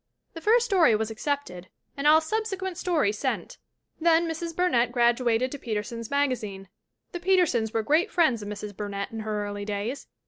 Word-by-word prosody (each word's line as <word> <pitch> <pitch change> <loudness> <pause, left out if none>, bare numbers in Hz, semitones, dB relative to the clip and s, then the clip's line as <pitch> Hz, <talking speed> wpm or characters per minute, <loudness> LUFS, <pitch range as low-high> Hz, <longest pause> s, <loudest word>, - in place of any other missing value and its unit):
"The 330 - -8
first 460 +6 +4
story 355 - +4
was 220 +1 -2
accepted 220 -7 -3 0.3
and 280 +1 -1
all 310 +1 +7
subsequent 380 0 -3
stories 300 - +1
sent. - - -3 0.4
Then 335 0 +3
Mrs. 330 0 -4
Burnett 250 -10 +2
graduated 240 0 +2
to 285 - -6
Peter 215 -5 -2
sons 230 0 -7
Magazine. 230 -9 -1 0.4
The 350 - -5
Petersons 345 - +2
were 225 -1 -1
great 310 +9 +2
friends 265 - +2
of 205 - -7
Mrs. 210 -1 -6
Burnett 200 -1 -4
in 225 - -6
her 215 -1 -3
early 205 0 -5
days. 210 +6 -4
250 Hz, 175 wpm, -26 LUFS, 215-330 Hz, 0.4 s, all